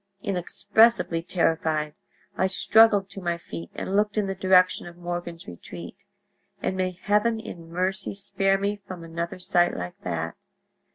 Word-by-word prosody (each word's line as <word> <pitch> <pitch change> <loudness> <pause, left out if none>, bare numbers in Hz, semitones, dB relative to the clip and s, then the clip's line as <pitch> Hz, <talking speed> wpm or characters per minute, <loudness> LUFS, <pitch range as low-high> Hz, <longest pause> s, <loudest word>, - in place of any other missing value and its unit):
Inexpressibly 200 0 +2
terrified, 160 -3 0 0.4
I 190 - +2
struggled 205 +1 +5
to 195 - -7
my 170 -1 -1
feet 85 - -8
and 195 - -3
looked 210 0 +1
in 210 - +2
the 195 - -2
direction 185 -1 +3
of 170 0 -11
Morgan's 175 -1 -5
retreat; 85 0 -10 0.5
and 190 - -2
may 185 -1 -2
heaven 210 +2 +2
in 170 -6 -9
mercy 185 +3 -1
spare 195 -1 +1
me 200 +1 -1
from 180 -2 -7
another 170 +1 -4
sight 180 -1 +2
like 90 0 -6
that! 85 -2 -3
180 Hz, 150 wpm, -26 LUFS, 165-195 Hz, 0.5 s, struggled